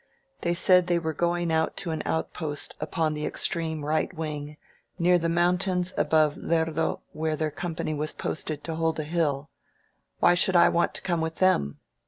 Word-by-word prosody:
They 170 0 0
said 180 0 +4
they 175 -1 +2
were 160 -2 -2
going 175 +1 0
out 160 0 0
to 170 - -3
an 160 - -2
outpost 155 -2 0
upon 160 -3 -1
the 150 0 -4
extreme 160 -3 -1
right 155 +1 0
wing, 150 -3 -5 0.4
near 175 0 +4
the 165 0 -1
mountains 180 +1 +1
above 155 -2 +2
Lerdo, 160 -1 0
where 155 0 -2
their 155 0 -2
company 160 -1 -4
was 150 +1 -2
posted 155 -1 -3
to 165 - -4
hold 160 0 -1
a - - -1
hill. 150 -2 -1 0.7
Why 175 - +5
should 185 +1 +2
I 170 - +7
want 170 - +1
to - - -5
come 170 -3 0
with 160 0 -3
them? 70 - +2
160 Hz, 180 wpm, -26 LUFS, 155-175 Hz, 0.7 s, I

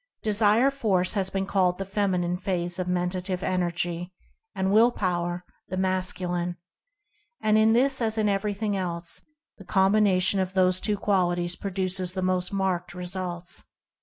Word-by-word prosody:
Desire 215 +4 +3
Force 200 -10 +1
has 195 -3 +1
been 195 0 -2
called 185 -2 +1
the 195 - -4
Feminine 185 -3 0
phase 180 -1 -3
of 180 - -2
Mentative 180 +1 -2
Energy; 175 -1 -1 0.4
and 190 +1 0
Will 230 +3 +6
Power 175 -4 -2 0.2
the 185 - -4
Mas 185 0 +1
culine. 175 -1 -3 0.8
And 215 0 +2
in 220 +1 +5
this 265 +2 +3
as 220 -1 +1
in 215 -1 +2
everything 205 +1 -1
else, 170 -3 -3 0.4
the - - -10
com 190 +1 +2
bination 195 -2 +3
of 185 0 -4
the 185 -1 +4
two 205 +3 -1
qualities 175 -3 0
produces 185 -1 -2
the 185 -1 -3
most 185 -1 0
marked 185 -3 -1
results. 180 -1 -3
185 Hz, 155 wpm, -26 LUFS, 180-200 Hz, 0.8 s, Will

